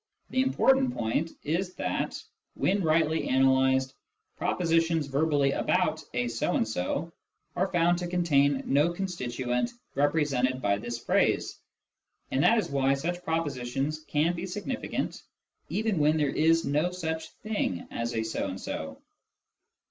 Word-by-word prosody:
The 260 Hz, -, +2 dB
important 265 Hz, -1 st, +3 dB
point 115 Hz, +9 st, 0 dB
is 180 Hz, +4 st, -1 dB
that, -, -, -2 dB, 0.4 s
when 200 Hz, +1 st, +1 dB
rightly 160 Hz, -1 st, +2 dB
analysed, 130 Hz, 0 st, +3 dB, 0.4 s
propositions 165 Hz, -2 st, +1 dB
verbally 140 Hz, 0 st, +2 dB
about 170 Hz, 0 st, +1 dB
" -, -, -35 dB
a 125 Hz, 0 st, +1 dB
so 115 Hz, -1 st, -1 dB
and 115 Hz, -, +1 dB
so 140 Hz, -, -2 dB, 0.2 s
" -, -, -47 dB
are 190 Hz, -, +1 dB
found 175 Hz, -1 st, +2 dB
to 175 Hz, -, -3 dB
contain 145 Hz, -6 st, +2 dB
no 145 Hz, +5 st, +3 dB
constituent 130 Hz, -, -2 dB, 0.2 s
represented 140 Hz, -3 st, +1 dB
by 100 Hz, -4 st, +1 dB
this 120 Hz, +2 st, -4 dB
phrase. -, -, +1 dB, 0.7 s
And 130 Hz, -, +1 dB
that 230 Hz, -, +5 dB
is 215 Hz, -, -1 dB
why 135 Hz, 0 st, +2 dB
such 175 Hz, +5 st, -3 dB
propositions 145 Hz, -3 st, -2 dB
can 155 Hz, +4 st, +2 dB
be 175 Hz, +2 st, -4 dB
significant 210 Hz, +7 st, -3 dB, 0.5 s
even 215 Hz, -4 st, 0 dB
when 150 Hz, +1 st, +3 dB
there 150 Hz, -2 st, +2 dB
is 165 Hz, +1 st, +3 dB
no 150 Hz, +5 st, +1 dB
such 160 Hz, -3 st, -4 dB
thing 210 Hz, -, -2 dB
as 115 Hz, 0 st, -3 dB
a 110 Hz, -, 0 dB
so 110 Hz, -2 st, -2 dB
and 95 Hz, 0 st, -5 dB
so. -, -, -5 dB
155 Hz, 145 wpm, -28 LUFS, 130-175 Hz, 0.7 s, that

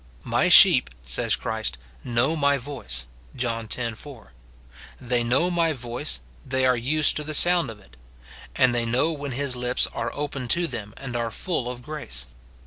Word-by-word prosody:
" -, -, -28 dB, 0.2 s
My -, -, +3 dB
sheep," -, -, +8 dB, 0.2 s
says 65 Hz, 0 st, +1 dB
Christ, 110 Hz, -, -3 dB, 0.3 s
"know 120 Hz, +6 st, +1 dB
my 140 Hz, -2 st, +2 dB
voice," 120 Hz, -, -4 dB, 0.3 s
John 115 Hz, -3 st, -3 dB
x. 115 Hz, -3 st, -3 dB
4; 145 Hz, -2 st, -12 dB, 0.2 s
— 65 Hz, +1 st, -25 dB
" -, -, -20 dB
They 120 Hz, -1 st, 0 dB
know 135 Hz, +10 st, +1 dB
my 165 Hz, -2 st, +2 dB
voice; 125 Hz, +3 st, -4 dB, 0.2 s
they 130 Hz, -1 st, 0 dB
are 130 Hz, 0 st, +4 dB
used 145 Hz, +6 st, +1 dB
to 150 Hz, -, -3 dB
the 155 Hz, 0 st, -1 dB
sound 175 Hz, -3 st, +5 dB
of 110 Hz, -2 st, -9 dB
it;" 65 Hz, -11 st, -20 dB, 0.6 s
and 130 Hz, -2 st, +4 dB
they 120 Hz, -1 st, +1 dB
know 125 Hz, +8 st, +1 dB
when 145 Hz, -4 st, -5 dB
his 135 Hz, 0 st, -2 dB
lips 125 Hz, 0 st, 0 dB
are 115 Hz, -, -2 dB
opened 140 Hz, -4 st, -4 dB
to 175 Hz, -, 0 dB
them 105 Hz, -9 st, -6 dB
and 130 Hz, -3 st, -7 dB
are 115 Hz, -1 st, -1 dB
full 125 Hz, -1 st, -2 dB
of 125 Hz, 0 st, -7 dB
grace. 145 Hz, -, -4 dB
125 Hz, 190 wpm, -24 LUFS, 115-145 Hz, 0.6 s, sheep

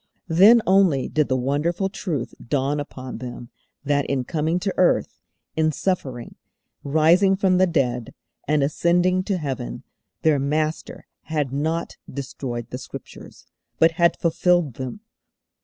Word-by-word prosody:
Then 215 Hz, +7 st, +7 dB
only 185 Hz, -8 st, +3 dB
did 150 Hz, -2 st, +1 dB
the 130 Hz, -, +1 dB
wonderful 150 Hz, +9 st, 0 dB
truth 175 Hz, -, -4 dB
dawn 140 Hz, +3 st, 0 dB
upon 130 Hz, -4 st, -7 dB
them 120 Hz, -1 st, -8 dB, 0.3 s
that 145 Hz, 0 st, +1 dB
in 135 Hz, -2 st, -1 dB
coming 160 Hz, +5 st, -1 dB
to 195 Hz, 0 st, -1 dB
earth, 180 Hz, -, +1 dB, 0.3 s
in 155 Hz, 0 st, +2 dB
suffering, 135 Hz, -8 st, -3 dB, 0.5 s
rising 165 Hz, +7 st, +4 dB
from 190 Hz, -2 st, +2 dB
the 185 Hz, -, +5 dB
dead, 125 Hz, -8 st, -1 dB, 0.3 s
and 150 Hz, -1 st, +2 dB
ascending 175 Hz, +5 st, +2 dB
to 195 Hz, -, 0 dB
Heaven, 135 Hz, -6 st, -5 dB, 0.4 s
their 155 Hz, -3 st, +3 dB
Master 155 Hz, +3 st, -2 dB, 0.2 s
had 150 Hz, -5 st, -2 dB
not 160 Hz, +4 st, -2 dB
destroyed 125 Hz, -3 st, -6 dB
the 125 Hz, -, -5 dB
Scriptures, -, -, -11 dB, 0.3 s
but 165 Hz, +1 st, +5 dB
had 170 Hz, +1 st, +2 dB
fulfilled 175 Hz, -3 st, +2 dB
them. 130 Hz, -, -6 dB
155 Hz, 135 wpm, -23 LUFS, 135-175 Hz, 0.5 s, Then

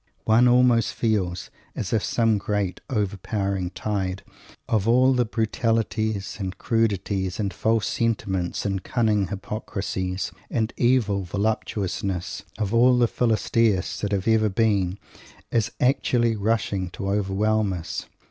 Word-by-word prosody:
One 115 Hz, +3 st, +5 dB
almost 125 Hz, -1 st, +4 dB
feels 95 Hz, -6 st, -1 dB, 0.2 s
as 100 Hz, -, -3 dB
if 110 Hz, -, +2 dB
some 115 Hz, -3 st, +2 dB
great 100 Hz, -2 st, -2 dB
overpowering 100 Hz, -4 st, -1 dB
tide 95 Hz, -2 st, -3 dB, 0.4 s
of 110 Hz, -2 st, +1 dB
all 130 Hz, +3 st, +5 dB
the 125 Hz, -1 st, +2 dB
brutalities 110 Hz, -2 st, -1 dB
and 95 Hz, -2 st, -4 dB
crudities 100 Hz, -4 st, 0 dB
and 100 Hz, -2 st, -1 dB
false 110 Hz, -2 st, +1 dB
sentiments 95 Hz, -7 st, -1 dB
and 95 Hz, -2 st, -1 dB
cunning 110 Hz, -5 st, +1 dB
hypocrisies, 95 Hz, -2 st, -4 dB, 0.2 s
and 110 Hz, 0 st, -1 dB
evil 115 Hz, -6 st, +2 dB
voluptuousness, 100 Hz, -2 st, -2 dB, 0.2 s
of 105 Hz, -1 st, -2 dB
all 125 Hz, +2 st, +5 dB
the 120 Hz, -1 st, +4 dB
Philistias 115 Hz, -4 st, +1 dB
that 105 Hz, -, -2 dB
have 100 Hz, 0 st, -1 dB
ever 110 Hz, -1 st, +4 dB
been, 100 Hz, -3 st, +1 dB, 0.5 s
is 115 Hz, -3 st, +1 dB
actually 120 Hz, -3 st, +2 dB
rushing 100 Hz, -3 st, 0 dB
to 95 Hz, -, -6 dB
overwhelm 105 Hz, +1 st, +1 dB
us! 85 Hz, -3 st, -5 dB
105 Hz, 125 wpm, -24 LUFS, 95-115 Hz, 0.5 s, One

